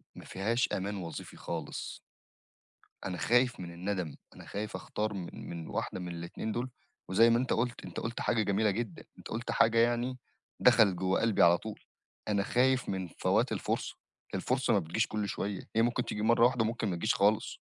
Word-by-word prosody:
ما - - -10
فيهاش 115 +6 0
أمان 100 +1 -2
وظيفي 85 -3 -7
خالص. - - -5 1.1
أنا 90 -2 -3
خايف 125 +6 +3
من 85 -1 -6
الندم، 90 -3 -3 0.2
أنا - - -11
خايف 105 +2 -4
أختار 105 0 -3
من 90 -3 -5 0.2
من 85 -1 -6
واحدة - - -3
من 90 - -5
الإتنين 85 +6 -4
دُول. 120 +3 -2 0.4
وزَي 115 +5 +6
ما 115 - +4
أنت 130 +1 0
قُلت، 120 +1 -1
أنت - - -5
قُلت 115 +1 -4
حاجة 110 -2 +2
جميلة 100 +2 +2
جدًا، 105 -4 -4
أنت - - -10
قُلت 115 +2 -3
حاجة 115 0 +4
يعني 120 +2 +2 0.4
دخَلِت 100 -5 +6
جوّه 95 +1 +1
قلْبي 115 -5 +3
على 85 0 +7
طُول. 110 -1 -7 0.5
أنا 100 -2 +2
خايف 130 +2 +2
من 95 -2 -2
فوات - - +1
الفُرصة، - - -2 0.4
الفُرصة 125 +5 +1
ما 100 - +4
بتجيش 90 +7 0
كُلّ 105 -1 -2
شوية، 100 -1 -3
هي 115 - +5
ممكن 120 +1 +1
تيجي 105 - -3
مرّة 115 +2 +5
واحدة 125 -2 +3
وممكن 110 0 -1
ما 90 - -1
تجيش 110 +9 +1
خالص. 105 +2 +2
110 Hz, 185 wpm, -31 LUFS, 95-115 Hz, 1.1 s, على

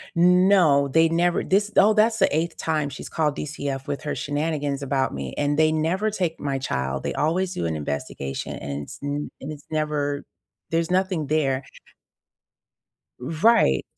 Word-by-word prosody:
No, 180 -5 +5
they 160 +4 +4
never 170 +2 +1
this 205 +2 +2
oh, 215 +2 +6
that's 220 +1 +3
the 190 -6 +3
8th 165 +1 -1
time 155 -3 -1
she's 140 - -8
called 150 -3 0
DCF 140 -2 -4
with 140 -3 -4
her 150 - -3
shenanigans 145 -1 -2
about 135 -1 0
me, 70 -2 -5
and 145 +1 0
they 155 0 +4
never 180 +7 0
take 180 -6 -2
my 140 -1 -1
child. 65 - -2
They - - -3
always 180 +4 0
do 85 - -2
an 80 - -2
investigation, 70 -2 -4
and 70 0 -5
it's - - -9
n 145 +1 -3
and 145 +3 -6
it's 145 -1 -12
never 150 -2 -1 0.5
there's 165 +1 0
nothing 185 -4 0
there. 140 -3 +1 1.6
Right. 155 - +3
150 Hz, 165 wpm, -24 LUFS, 140-170 Hz, 1.6 s, oh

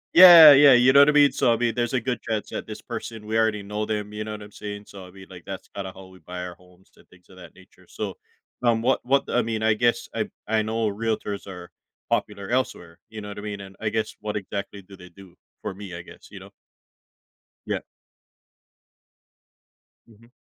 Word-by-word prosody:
Yeah, 170 -4 +11
yeah, 140 -1 +7
you 125 +2 +5
know 140 - +7
what 140 - +6
I - - +5
mean, 145 -2 +5
so 120 - +1
I - - -1
mean, 120 -1 0
there's 120 0 -2
a 130 - +2
good 120 0 -3
chance 110 -3 -4
that - - -6
this - - -8
person 110 -2 -7
we 110 +1 -4
already 110 -2 +1
know 105 +1 -4
them, 105 -1 -4
you 105 0 -4
know, 110 - -6
what 105 -1 -8
I'm 105 - -13
saying, 105 0 -8
so, 95 -2 -12
I - - -14
mean, 95 +1 -14
like, 90 -2 -12
that's 95 -1 -9
kinda 95 -2 -7
how 95 0 -13
we 95 0 -17
buy 90 +2 -7
our 90 - -8
homes 90 +1 -24
and - - -23
things 90 +1 -23
of 95 - -17
that 90 -3 -14
nature, 95 - -21
so, - - -5 0.5
um, 115 -2 +1
what 130 +2 +1
what 135 +2 +2
I 125 - +1
mean, 110 -1 -3
I 110 -1 +3
guess 120 +2 0
I - - -3 0.2
I 110 0 +1
know 110 +1 -1
realtors 105 -1 -3
are 90 -2 -10 0.4
popular 100 -1 -2
elsewhere, 90 -10 -3
you 110 -1 -8
know 105 - -8
what 100 - -8
I - - -7
mean, 105 -1 -6
and 95 0 -11
I 110 - -2
guess 110 0 -3
what 105 0 -4
exactly 100 0 -6
do 95 +1 -15
they 90 -1 -14
do 95 +1 -16 0.3
for - - -4
me, 95 -2 -9
I 85 - -9
guess, - - -15
you - - -11
know. - - -14 1.1
Yeah. - - -3 2.2
Mhm. 115 +2 -21
105 Hz, 230 wpm, -24 LUFS, 95-115 Hz, 2.2 s, Yeah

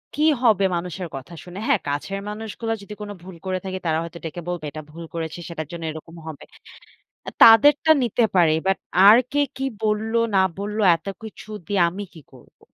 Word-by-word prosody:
কি 300 - 0 0.2
হবে 215 -5 +4
মানুষের 180 +1 -5
কথা 135 +5 -9
শুনে। 180 +2 -9
হ্যাঁ, 275 -7 +3
কাছের 150 +8 -3
মানুষগুলা 220 +1 -4
যদি 200 +1 -9
কোনো 205 0 -6
ভুল 185 0 -10
করে 185 0 -1
থাকি 190 0 -4
তারা 160 -1 +1
হয়তো 170 0 -8
ডেকে 165 +2 -6
বলবে 175 -3 -4
এটা 155 - -7
ভুল 165 +2 -9
করেছি 165 0 -5
সেটার 155 -3 -5
জন্য 170 -1 -7
এরকম 160 +2 -11
হবে। 155 -3 -8 0.8
আ - - -1
তাদেরটা 290 +8 +7
নিতে 240 0 +1
পারি 170 -4 +5
বাট 195 - +2 0.3
আর 215 +3 +9
কে 290 - +2 0.2
কি 270 - -2 0.2
বলল, 215 +1 0 0.2
না - - +5 0.2
বলল 210 +1 -4 0.2
এত 165 +3 -12 0.2
কিছু 215 0 -10 0.2
দিয়ে 200 -3 +1
আমি 195 +4 -6
কি 160 - -13
করব? - - -19
190 Hz, 195 wpm, -22 LUFS, 165-215 Hz, 0.8 s, আর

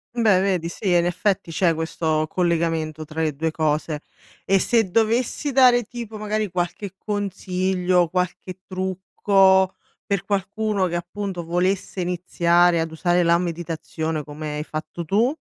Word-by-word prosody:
Beh 215 -6 +4
vedi 180 -4 0
sì, 190 +3 -3
in 175 0 +4
effetti 180 0 0
c'è 170 +1 +2
questo 160 -1 -1
collegamento 165 -3 0
tra 160 +2 -4
le 155 -2 0
2 160 +3 -1
cose. 155 -1 -1 0.4
E 195 0 +3
se 225 -4 +2
dovessi 230 +6 +1
dare, 250 -2 +6
tipo, 225 -1 -8
magari 215 -1 -2
qualche 180 +2 -3
consiglio, 185 -3 0
qualche 180 +1 -3
trucco 190 0 +2 0.3
per 200 -2 -1
qualcuno 200 0 0
che 175 0 -2
appunto 180 0 -5
volesse 185 +2 -1
iniziare 175 -1 +2
ad 165 - -3
usare 175 +2 +1
la 170 0 +4
meditazione 165 -2 -3
come 150 0 -6
hai 150 - -3
fatto 155 +2 -6
tu? 225 - +2
180 Hz, 140 wpm, -23 LUFS, 165-200 Hz, 0.4 s, dare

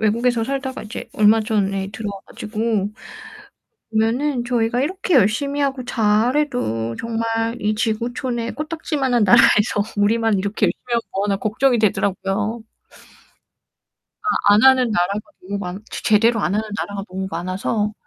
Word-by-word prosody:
외국에서 230 +2 +1
살다가 265 +1 -4
이제 215 +1 -7
얼마 215 +1 +5
전에 195 -3 -1
들어와 200 -2 -5
가지고 215 -2 -2 1.0
보면은 240 +4 0
저희가 240 0 0
이렇게 370 +3 -1
열심히 280 +6 +2
하고 270 -2 -1
잘 225 +1 +2
해도 115 - -1
정말 230 0 -2
이 210 +1 0
지구촌에 235 +2 -2
코딱지만한 295 -7 -1
나라에서 205 +1 +5
우리만 220 0 +2
이렇게 200 +2 0
열심히 - - -3
하면 235 - +3
뭐하나 200 +1 0
걱정이 235 +5 +1
되더라고요. 205 +1 0 1.9
아. 205 - +7
안 210 - +4
하는 260 -2 +5
나라가 200 +1 0 0.2
너무 200 +2 -5
많 185 +1 -6
제 - - -6
제대로 225 +1 +3
안 195 - 0
하는 215 +1 -1
나라가 200 -1 -4
너무 190 +1 -4
많아서 185 +5 -2
220 Hz, 330 characters per minute, -20 LUFS, 205-245 Hz, 1.9 s, 아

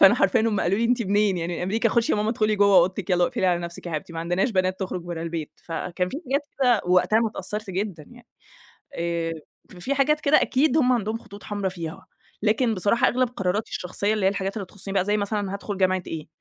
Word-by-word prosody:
فأنا 195 +4 +8
حرفيًا 195 -3 +3
هم 220 -3 +1
قالوا 190 +5 +1
لي: 230 - +1
"أنت 240 0 +2
منين 205 -1 +2
يعني 170 +1 -3
أمريكا؟ 220 +5 +1
خشي 235 +1 +1
يا - - +2
ماما 210 +1 0
ادخلي 215 -2 +1
جوّه 200 -1 +5
أوضتك 185 +2 +2
يالّا 180 -1 +4
واقفلي 185 - 0
على 175 -1 +2
نفْسِك 170 +1 -7
يا - - -4
حبيبتي، 155 +2 -4
ما 165 - -4
عندناش 175 +7 0
بنات 185 -1 0
تخرج 185 -1 -3
برّه 170 -2 -5
البيت." 165 -2 -4
فكان 180 +2 -3
في 285 - -5
حاجات 280 +3 -1
كده 245 -5 +4
وقتها 180 +4 +3
انا 230 -1 +2
اتأثّرت 210 -1 -5
جدًا 185 -5 -3
يعني، 240 -1 -16 0.7
آآ 170 -1 -2 0.5
في 270 +10 -1
حاجات 300 +3 +2
كده 295 0 +4
أكيد 280 +2 +2
هم 255 -4 +4
عندهم 225 -1 -1
خطوط 205 -2 -13
حمرا 205 -2 -2
فيها، 170 -2 -7 0.4
لكن 220 +1 +2
بصراحة 200 +5 +3
أغلب 255 +1 +1
قراراتي 195 +3 -1
الشخصيّة 200 +4 -1
اللي 210 -3 +1
هي - - +5
الحاجات 195 +2 -3
اللي 195 -3 -4
تخصني 195 +1 -7
بقى، 190 -1 +2
زي 210 +1 +1
مثلًا 205 -1 -2
هادخل 200 0 -4
جامعة 185 -1 +2
إيه، 160 -2 -6
200 Hz, 225 wpm, -24 LUFS, 180-225 Hz, 0.7 s, فأنا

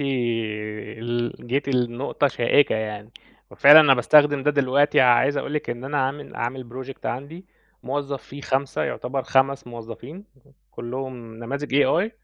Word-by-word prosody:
ال 115 -2 -3
جيتِ 135 +3 -1
لنقطة 125 +2 0
شائكة 130 +2 +2
يعني، 105 0 -5 0.4
وفعلًا 145 +3 +8
أنا 140 -3 +6
باستخدم 145 +2 +4
ده 150 - +2
دلوقتي 145 +1 +2
عايز 130 +3 +4
أقول 145 - -3
لِك 150 - -3
إن 120 +2 -6
أنا 145 +1 -2
عامل 135 +2 -4
عامل 125 +1 -4 0.2
project 135 0 -9
عندي 145 +9 -6 0.4
موظّف 140 0 -4
فيه 140 - -11
5، 135 0 -1
يُعتَبر 130 +1 -3
5 135 0 +1
موظّفين 120 - -10 0.5
كُلّهم 120 -1 -7
نماذج 140 +4 -5
AI، 180 +11 +1
130 Hz, 135 wpm, -23 LUFS, 120-140 Hz, 0.5 s, وفعلًا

